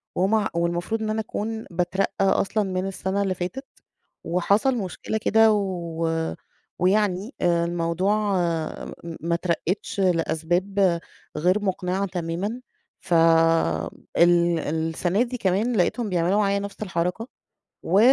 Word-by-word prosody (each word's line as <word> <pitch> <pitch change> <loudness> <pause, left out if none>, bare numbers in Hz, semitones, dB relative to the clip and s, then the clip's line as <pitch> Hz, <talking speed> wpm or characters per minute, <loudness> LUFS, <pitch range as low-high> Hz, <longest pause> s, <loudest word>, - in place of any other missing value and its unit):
ومع 210 +3 +2
والمفروض 175 +6 -1
إن 215 - -2
أنا 220 +1 0
أكون 220 +1 -4
باترقى 185 +3 0
أصلًا 205 +2 +2
من 185 -1 -2
السنة 195 +1 -2
اللي 190 - 0
فاتت. 185 +11 -5 0.6
وحصل 200 +9 +2
مشكلة 200 +1 -3
كده 220 +1 +4
و 165 -5 -2 0.4
ويعني 200 +4 +1
آآ، 170 -1 +2
الموضوع 175 +4 0 0.9
م 170 -1 -6
ما 170 +1 -1
اترقتش 180 +3 -2
لأسباب 175 +1 +1 0.4
غير 180 +6 +2
مقنعة 190 0 -1
تمامًا، 180 +6 -3 0.4
ف 185 - -4 1.0
ال 170 -1 +4
السنة 160 +7 0
دي 250 0 -5
كمان 215 +4 +1
لقيتهم 215 +5 +1
بيعملوا 180 +2 +1
معايّا 200 -1 +2
نفْس 200 +1 -6
الحركة، 180 +4 -2 0.6
و 190 +4 +3
185 Hz, 120 wpm, -24 LUFS, 170-205 Hz, 1.0 s, كده